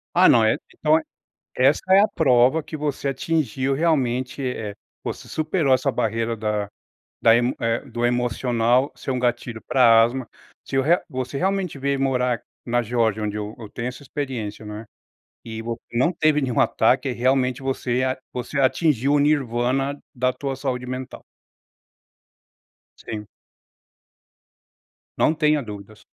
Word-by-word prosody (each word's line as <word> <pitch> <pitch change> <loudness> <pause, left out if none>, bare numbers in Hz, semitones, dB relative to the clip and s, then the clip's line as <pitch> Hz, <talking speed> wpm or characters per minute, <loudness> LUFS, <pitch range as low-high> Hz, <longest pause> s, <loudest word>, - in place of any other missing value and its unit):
Ah, - - +7
não, 115 - +6
eh 110 - +3
e - - -7 0.2
então 155 0 +3
é 160 - -3 0.5
essa 135 +3 +3
é 195 - +8
a 210 - +4
prova 130 0 +3
que 155 - -7
você 145 -1 -2
atingiu 135 -2 -1
realmente, 135 -4 0
eh, 110 -5 -3 0.3
você - - -6
superou 155 -3 +1
essa 130 +1 0
barreira 115 0 -1
da 105 -1 -2 0.5
da 115 0 +6
emo 120 +1 +1
eh, 115 0 0
do 120 0 -1
emocional 120 +1 +1
ser - - -8
um 130 - 0
gatilho 120 -2 -1
pra 115 -3 +6
asma. 125 +1 -2 0.3
Se - - -6
eu 135 - +3
re 170 +5 +3
você 130 +1 -4
realmente 190 -6 -1
veio 140 0 0
morar 125 -3 +1 0.2
na 120 0 0
Geórgia, 110 -2 0
onde 105 0 -2
eu 105 +1 -5
eu 110 -3 -9
tenho 120 +3 -5
essa 125 +2 -7
experiência, 125 -7 -5
né, 105 +1 -7 0.6
e 110 -1 -6
vo 115 0 -4
não 130 +10 +2
teve 155 -2 +2
nenhum 130 -3 +1
ataque, 130 +4 +2
realmente 125 +1 +1
você 130 -1 -1
a 130 0 -1
você 125 +3 -5
atingiu 140 -1 +2
o 145 - +4
nirvana 135 -1 +1 0.2
da 130 +1 +1
tua 135 +1 -4
saúde 130 -2 -3
mental. 130 0 -6 1.8
Sim. 105 -1 -5 1.9
Não - - +3
tenha 150 -2 +2
dúvidas. 105 -2 -10
125 Hz, 155 wpm, -23 LUFS, 115-140 Hz, 1.9 s, é